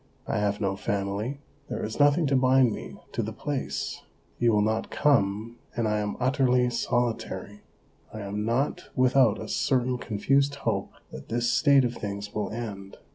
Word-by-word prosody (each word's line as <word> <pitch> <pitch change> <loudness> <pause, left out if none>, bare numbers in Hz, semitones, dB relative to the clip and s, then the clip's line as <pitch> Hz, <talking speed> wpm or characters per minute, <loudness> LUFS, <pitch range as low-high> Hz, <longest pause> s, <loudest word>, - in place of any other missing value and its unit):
I - - -1
have 105 0 0
no 100 -2 0
family; 100 +7 -2 0.3
there - - -3
is 110 +5 -6
nothing 145 +3 +5
to 140 -1 +2
bind 130 -2 +4
me - - -8
to - - -1
the - - -3
place; - - -3 0.4
you 120 -1 +4
will 105 -1 +3
not 110 +1 0
come, 115 -4 +1 0.2
and 115 -1 0
I 105 0 +1
am 105 0 -3
utterly 125 -1 +2
solitary. 115 -4 -2 0.5
I 110 - -7
am 100 +1 -3
not 120 +6 -1
without 130 -4 +4
a - - -6
certain 125 -2 +1
confused 135 +7 +1
hope - - -2 0.2
that 65 - -10
this 120 +1 +1
state 140 -4 +5
of 120 - -1
things 100 -2 -5
will 105 -2 -2
end. 105 -4 -6
115 Hz, 170 wpm, -27 LUFS, 105-130 Hz, 0.5 s, nothing